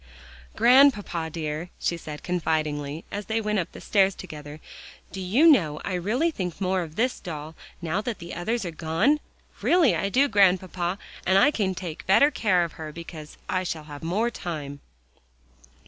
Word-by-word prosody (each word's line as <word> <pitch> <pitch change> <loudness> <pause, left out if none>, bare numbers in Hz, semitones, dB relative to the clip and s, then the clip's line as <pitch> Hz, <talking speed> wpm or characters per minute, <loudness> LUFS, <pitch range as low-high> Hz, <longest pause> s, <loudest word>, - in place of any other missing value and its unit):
"Grandpapa, 235 -9 +4
dear," 155 +1 -4
she 170 - -1
said 150 -3 -8
confidingly 155 -3 -2
as 205 -1 -5
they 225 0 0
went 210 -1 0
up 175 - -3
the - - -11
stairs 195 -2 +2
together, 150 -4 -9 0.5
"do 190 - -6
you 210 - +3
know 170 - +5
I 195 - -2
really 225 - +1
think 180 - -4
more 190 -1 +1
of 160 -2 -7
this 245 +5 0
doll, 155 -3 -7 0.3
now 170 +5 -1
that 230 -1 -4
the 170 0 -8
others 220 +5 -2
are 175 - -3
gone? 165 - +1 0.4
Really 340 -7 +4
I 195 - -1
do, 270 +7 +3
Grandpapa, 185 -4 +2 0.3
and 190 +1 +3
I 290 +10 +6
can 195 -8 -1
take 175 -3 -7
better 280 +10 +6
care 190 -10 +2
of 170 - -4
her, 155 -1 -5
because 160 -1 -10
I 185 0 0
shall 160 -3 -4
have 145 -1 -10
more 205 +9 0
time." 150 -8 -6
180 Hz, 175 wpm, -25 LUFS, 160-210 Hz, 0.5 s, I